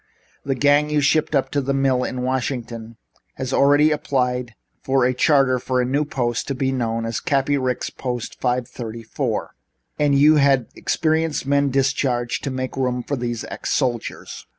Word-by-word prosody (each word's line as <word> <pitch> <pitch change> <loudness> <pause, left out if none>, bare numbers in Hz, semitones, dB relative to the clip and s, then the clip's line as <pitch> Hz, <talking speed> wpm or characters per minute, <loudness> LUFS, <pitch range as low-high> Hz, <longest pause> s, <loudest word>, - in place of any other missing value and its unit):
The 135 -1 -1
gang 145 +3 +3
you 150 0 +2
shipped 150 +2 +2
up 135 - +1
to 145 - 0
the 135 +1 -1
mill 135 -2 +2
in 125 0 -3
Washington 120 -3 -3 0.4
has 130 0 -4
already 145 +2 +4
applied 125 -5 -1 0.3
for 135 -1 +2
a 125 - +2
charter 135 -1 +3
for 125 +1 -1
a 125 - +2
new 140 +4 0
post 120 -5 -2
to 140 - -2
be 135 0 0
known 115 -3 -1
as 115 - -2
Cappy 140 0 +1
Ricks 130 -3 -2
Post 125 -3 -5
No. 125 - +2
534. 120 -2 -3 0.5
And 145 -1 +3
you 150 +2 +6
had 135 -4 +3
experienced 160 -2 0
men 140 0 +2
discharged 130 -2 0
to - - -1
make 130 0 -4
room 125 -2 -1
for 145 - -2
these 120 -2 -3
ex - - -3
soldiers." 120 -5 -3
130 Hz, 175 wpm, -21 LUFS, 125-140 Hz, 0.5 s, you